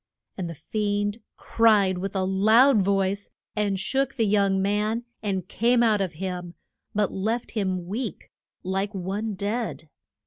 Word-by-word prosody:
And 180 -3 -4
the 165 - -6
fiend 205 +4 -1 0.2
cried 205 -5 +3
with 195 +2 -4
a 190 - +1
loud 215 +6 +5
voice, 195 +1 0 0.3
and 205 -2 0
shook 270 +6 -1
the 230 -4 +2
young 200 -2 +2
man, 210 +4 0 0.2
and 190 -4 -2
came 240 +3 +2
out 215 -3 +3
of 185 -3 -2
him, 180 0 -5 0.4
but 210 -2 +1
left 220 +5 -2
him 185 -5 -1
weak, 215 +2 -5 0.3
like 195 +3 -2
one 200 +3 -3
dead. 205 -4 -3
200 Hz, 145 wpm, -25 LUFS, 190-220 Hz, 0.4 s, loud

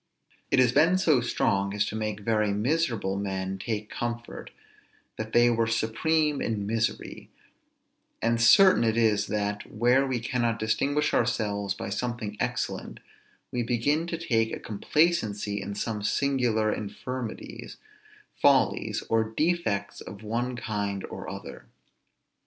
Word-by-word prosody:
It - - +2
has 125 -2 +5
been 160 +7 +4
so 155 -9 +3
strong 100 -4 0
as 105 - +1
to - - -5
make 105 -1 -3
very 105 -1 +1
miserable 115 -4 0
men 95 -1 -3
take 105 +1 -4
comfort, 120 0 -5 0.7
that 110 0 -5
they 120 +1 +5
were 115 -1 +1
supreme 145 +7 +1
in 105 -3 -2
misery; 110 +2 -2 0.9
and 115 0 +1
certain 185 +6 +7
it 110 0 +1
is 105 -3 +2
that, 105 0 -2
where 125 +5 +3
we 130 -2 -1
cannot 120 -1 -1
distinguish 135 +7 0
ourselves 105 -4 0
by 100 - -6
something 120 -2 -3
excellent, - - -3 0.5
we 125 - -1
begin 125 +8 0
to 170 - -3
take 115 -9 0
a - - -4
complacency 105 -4 0
in 100 +1 -5
some 105 0 -3
singular 115 -2 +1
infirmities, 115 +3 -6 0.6
follies, 130 -6 +2
or 115 0 +2
defects 110 - -1
of 100 +2 -10
one 120 +3 -2
kind 100 -4 -3
or - - -6
other. - - -9
115 Hz, 135 wpm, -27 LUFS, 105-125 Hz, 0.9 s, certain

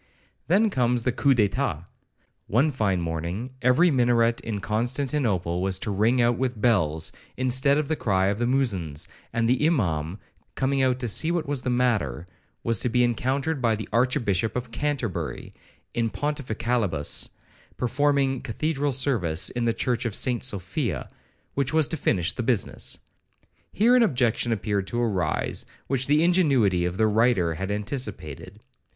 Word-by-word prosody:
Then 205 +5 +3
comes 125 -4 +1
the 125 - +1
coup 135 +2 +2
d'eclat,—one 110 - -2
fine 100 -9 0
morning, 85 +9 -4
every 130 +8 +4
minaret 120 -3 +2
in 110 -3 -4
Constantinople 110 - -1
was 95 0 0
to 105 - -4
ring 110 +6 +2
out 120 0 +2
with 125 -4 -1
bells, 85 -10 +1 0.3
instead 130 +2 +3
of 150 -2 -1
the 160 - 0
cry 95 -8 +1
of 100 +2 0
the 120 - +1
Muezzins; 95 - -1 0.2
and 115 -1 0
the 125 +4 +2
Imaum, 90 - 0 0.4
coming 135 +1 +1
out 130 -1 +2
to 120 - -1
see 135 +9 +1
what 170 -2 0
was 140 -2 -2
the 125 - -3
matter, 110 - 0 0.4
was 115 -3 0
to 125 - 0
be 125 +2 +2
encountered 135 +5 0
by 115 -3 +2
the 110 - -6
Archbishop 115 -4 +1
of 125 -1 -4
Canterbury, 140 -9 -3 0.4
in 115 -1 0
pontificalibus, 115 - -1 0.5
performing 135 +1 +1
Cathedral 145 +3 -1
service 115 - +1
in 120 -1 -2
the 115 - +3
church 120 +1 -1
of 110 -3 -1
St 125 -2 +1
Sophia, 100 - -2 0.4
which 140 +1 -1
was 160 -2 +3
to - - -1
finish 90 - +1
the - - -3
business. 120 -3 0 0.7
Here 235 +4 +4
an 250 - +5
objection 120 - +1
appeared 100 -3 -1
to 120 - -2
arise, 95 -10 -1 0.2
which 130 -1 -1
the 150 +3 +4
ingenuity 135 - +3
of 90 +1 -3
the 110 - +3
writer 110 -6 +2
had 95 +4 -4
anticipated. 105 - -4
120 Hz, 155 wpm, -25 LUFS, 100-135 Hz, 0.7 s, an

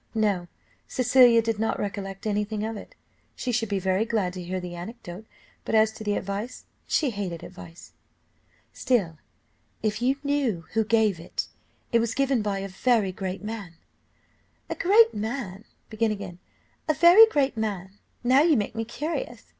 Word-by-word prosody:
No, 200 -5 +1 0.4
Cecilia 245 -2 +5
did 225 -2 -1
not 225 - 0
recollect 195 -1 -5
any 210 -1 +1
thing 210 0 -4
of 225 0 -4
it. - - -10 0.4
She 255 - -3
should 225 -2 -1
be 200 - 0
very 190 +2 +1
glad 215 -6 -1
to 180 - -6
hear 185 +1 -3
the 180 -1 -7
anecdote, 185 +2 -9 0.4
but - - -1
as 220 0 +4
to 220 - -10
the 205 -1 0
advice, 200 +6 -5 0.2
she 290 -5 +1
hated 190 -6 -5
advice. 175 -2 -12 0.8
"Still, 185 -11 0 0.6
if 215 0 -1
you 260 +3 +2
knew 270 - 0
who 225 0 +2
gave 215 -4 +2
it 165 - -5 0.4
it 235 - +4
was 230 0 -1
given 270 -3 +1
by 205 -2 -1
a 195 0 -4
very 205 +1 +1
great 190 +1 -5
man." 210 -6 -6 1.0
"A - - +2
very 410 +6 +6 2.2
great 275 - 0
man! 205 -4 -2 0.4
now 260 +3 +5
you 315 -3 +4
make 205 - -2
me 225 - -2
curious. 305 - -4
215 Hz, 155 wpm, -26 LUFS, 195-240 Hz, 2.2 s, very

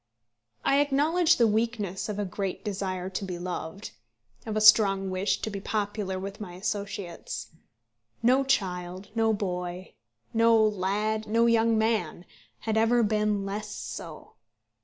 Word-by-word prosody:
I 275 - +4
acknowledge 300 +4 +3
the 235 - +5
weakness 215 -3 -1
of 205 - -3
a 205 - -1
great 195 +2 -4
desire 190 -3 -3
to 190 - -3
be 185 -2 -4
loved, 175 +1 -5 0.6
of 215 -1 -2
a - - +3
strong 195 -3 +6
wish 185 +2 0
to 220 - -3
be 200 -1 -5
popular 205 -2 -2
with 195 +2 -6
my 180 -4 -7
associates. 180 - -5 0.7
No 255 +3 +4
child, 185 -6 -1
no 225 -1 +2
boy, 180 -3 -4 0.4
no 230 0 +5
lad, 215 +1 0
no 230 +2 +3
young 230 -1 +3
man, 220 -6 0 0.4
had 220 -1 -1
ever 230 +2 +4
been 210 -1 +1
less 210 +1 -5
so. 160 -2 -8
205 Hz, 140 wpm, -27 LUFS, 185-225 Hz, 0.7 s, strong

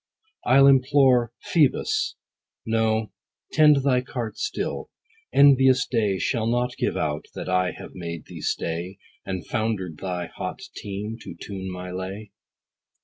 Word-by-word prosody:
I'll 135 +2 +7
implore 130 -3 +5
Phoebus. 420 - +1 0.5
No, 110 -1 +1 0.4
tend 150 -3 +5
thy 130 -2 +3
cart 120 -3 -5
still. - - -3 0.4
Envious 130 -2 +6
day 105 -6 0
Shall 115 +2 0
not 125 +1 0
give - - -1
out 75 -1 -2
that - - -5
I 90 0 +1
have - - -10
made 85 -3 -6
thee - - -10
stay, 85 +3 -3 0.3
And 95 -2 -4
founder'd 105 -8 -2
thy 90 -2 -3
hot - - -6
team, 105 +3 -5
to - - -9
tune 95 -2 -6
my 90 0 -6
lay. 95 +3 -6
110 Hz, 135 wpm, -24 LUFS, 95-130 Hz, 0.5 s, I'll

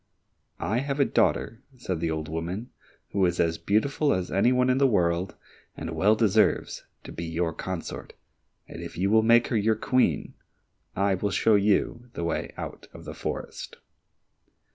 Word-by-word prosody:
"I 110 +4 0
have 140 +1 -3
a 140 - +5
daughter," 115 -2 +1 0.2
said 95 -8 -3
the 85 0 -1
old 80 -1 -3
woman, 85 +9 -4 0.4
"who 100 - +1
is 90 0 -2
as 85 -1 +1
beautiful 140 +8 +1
as 90 -1 -3
any 100 +6 +3
one 125 0 +3
in 130 +1 +2
the 140 - +5
world, 90 -4 +1 0.4
and - - -5
well 105 +3 +3
deserves 110 -3 +1 0.2
to - - -9
be 85 - -5
your 80 0 -1
consort, 95 +1 -6 0.5
and - - -9
if - - -8
you 95 +3 +1
will 110 0 +6
make 115 +1 +4
her 120 - -1
your 110 +1 +2
Queen, 125 +4 +1 0.6
I 100 0 +2
will 100 +2 -1
show 110 +3 +2
you 105 +4 +1
the - - -4
way 85 -1 -2
out - - -7
of - - -11
the - - -6
forest." - - -6
100 Hz, 175 wpm, -26 LUFS, 85-120 Hz, 0.6 s, will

